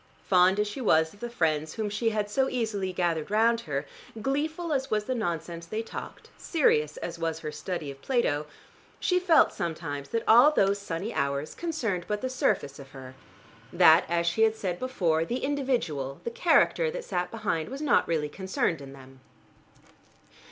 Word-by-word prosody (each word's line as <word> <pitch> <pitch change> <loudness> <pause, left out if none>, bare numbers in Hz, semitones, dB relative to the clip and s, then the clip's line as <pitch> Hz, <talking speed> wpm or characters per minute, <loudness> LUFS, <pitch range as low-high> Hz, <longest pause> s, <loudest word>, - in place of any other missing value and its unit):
Fond 185 +1 +4
as 210 - +1
she 205 +6 -6
was 160 -8 +3
of 205 - -18
the 240 - -5
friends 155 -7 -1
whom 215 -1 -2
she 210 +3 0
had 210 -2 -1
so 265 +6 +1
easily 220 -6 -2
gathered 170 -3 -1
round 230 +2 +3
her, 145 -6 -3 0.3
gleeful 310 +7 -2
as 270 -1 -1
was 210 -1 0
the 255 - -2
nonsense 170 -6 -4
they 220 +5 -3
talked, - - -9
serious 150 - +1
as 170 -1 -6
was 165 -1 -2
her 150 - -4
study 150 -1 -5
of 135 0 -14
Plato, 155 - 0 0.5
she 360 0 +2
felt 350 -4 +4
sometimes 155 -4 -4
that 230 -1 -1
all 245 +6 +8
those 200 -9 +2
sunny 200 +3 -4
hours 140 +1 -2
concerned 230 - -2
but 210 0 -2
the 255 - -2
surface 145 - 0
of 135 -1 -12
her, 130 -1 -10 0.6
that, 170 -1 +6
as 170 0 +1
she 170 +6 0
had 220 0 +4
said 180 -5 -3
before, 175 -11 0
the 240 +9 -3
individual, 240 - -1
the 235 - -3
character 360 - +3
that - - -6
sat 180 -1 -2
behind 200 -7 -2
was 270 +2 -6
not 300 -1 +2
really 155 -3 0
concerned 180 -2 -2
in 135 -1 -10
them. 135 -1 -15
190 Hz, 180 wpm, -27 LUFS, 160-235 Hz, 0.6 s, all